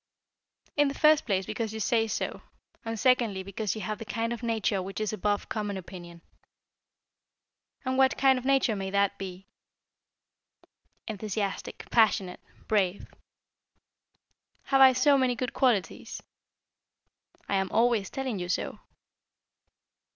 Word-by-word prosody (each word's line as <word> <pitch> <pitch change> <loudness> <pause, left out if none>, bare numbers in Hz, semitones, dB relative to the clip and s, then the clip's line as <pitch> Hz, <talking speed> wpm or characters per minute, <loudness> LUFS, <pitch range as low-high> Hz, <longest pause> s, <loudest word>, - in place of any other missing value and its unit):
"In 290 -1 +4
the 275 - -3
first 305 -3 +4
place 190 -3 0
because 220 +1 -4
you - - -4
say 225 0 +1
so, - - -3 0.4
and 225 -1 -4
secondly 235 -7 +2
because 200 +2 -3
you 215 - -5
have 215 +1 -4
the - - -5
kind 225 +2 -2
of 235 - -7
nature 220 -4 0
which 195 +3 -6
is 215 0 -2
above 205 -1 -1
common 205 -2 -3
opinion." 175 -2 -10 1.6
"And 260 +1 0
what 265 -1 +4
kind 265 -1 +4
of - - -11
nature 270 -4 +2
may 195 -1 -4
that 200 0 +1
be?" 190 0 -7 1.6
"Enthusiastic, 205 -2 -4
passionate, 200 -5 +2 0.3
brave." 200 -3 0 1.5
"Have 270 0 +2
I 260 -1 +9
so 275 +2 +4
many 255 -2 +2
good 250 0 -3
qualities?" 235 -8 0 1.2
"I - - -3
am 190 -1 -1
always 230 -4 +2
telling 260 -6 -3
you 180 0 -5
so." - - -2
220 Hz, 135 wpm, -28 LUFS, 195-250 Hz, 1.6 s, I